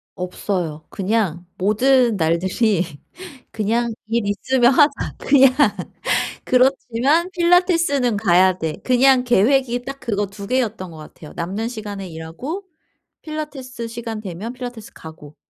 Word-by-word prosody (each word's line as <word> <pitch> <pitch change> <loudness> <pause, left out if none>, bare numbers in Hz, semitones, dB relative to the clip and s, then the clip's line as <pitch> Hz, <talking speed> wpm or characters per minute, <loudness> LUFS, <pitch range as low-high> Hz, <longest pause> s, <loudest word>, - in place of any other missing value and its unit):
없어요. 180 -4 -4
그냥 190 -4 -1
모든 235 +4 +3
날들이 180 +4 +1 0.7
그냥 230 +2 -1
‘일 230 0 0
있으면 245 +5 +2
하자 295 +1 +5 0.3
그냥. 270 -2 +5 0.9
그렇지만 265 +5 +2
필라테스는 340 - +2
가야 185 -2 +3
돼.‘ 160 -3 -3
그냥 255 0 +4
계획이 245 +2 +2
딱 275 0 -7
그거 205 -3 -1
2 200 +1 -9
개였던 225 -6 -1
것 160 - -12
같아요. 155 0 -12
남는 195 +7 -3
시간에 205 -5 -6
일하고 170 - -6 0.6
필라테스 275 -6 -6
시간 230 -1 -6
되면 200 +3 -6
필라테스 245 -4 -8
가고. 155 -2 -12
230 Hz, 265 characters per minute, -20 LUFS, 190-260 Hz, 0.9 s, 하자